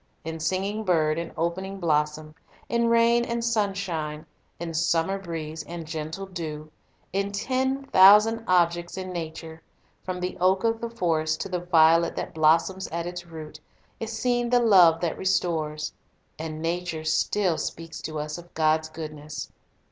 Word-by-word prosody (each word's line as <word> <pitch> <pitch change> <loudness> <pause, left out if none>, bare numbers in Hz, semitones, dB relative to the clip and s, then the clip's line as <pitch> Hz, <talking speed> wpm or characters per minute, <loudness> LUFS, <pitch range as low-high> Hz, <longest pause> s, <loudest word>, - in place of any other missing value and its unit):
In 160 0 -5
singing 190 +6 -1
bird 160 -4 +2
and 170 0 -5
opening 190 +4 -2
blossom, 155 -2 0 0.3
in 235 0 +1
rain 235 +1 +4
and 235 0 -2
sunshine, 190 -9 -1 0.3
in 170 -1 -5
summer 170 +3 +1
breeze 165 -3 -5
and 170 -1 -7
gentle 160 +4 -5
dew, 155 -5 -6 0.4
in 200 +1 0
ten 260 +6 -1
thousand 210 0 +6
objects 175 0 +2
in 185 -1 -5
nature, 160 -1 -6 0.4
from 185 -1 -4
the 180 0 -3
oak 190 +1 +3
of 225 0 +1
the 235 - -3
forest 160 -7 0
to - - -4
the 180 -1 -1
violet 165 -1 +4
that - - -4
blossoms 165 +4 +2
at 170 +1 -4
its 175 0 -6
root, 160 -2 -9 0.4
is 225 0 -4
seen 240 0 0
the 245 0 +4
love 180 -8 +6
that 170 -2 -2
restores. 160 -5 -1 0.5
And 155 0 -5
nature 170 -1 -2
still 170 +2 +1
speaks 165 0 -5
to 155 -1 -5
us 150 +2 -4
of 175 0 -14
God's 155 0 +2
goodness. 155 -1 -7
170 Hz, 155 wpm, -26 LUFS, 160-195 Hz, 0.5 s, thousand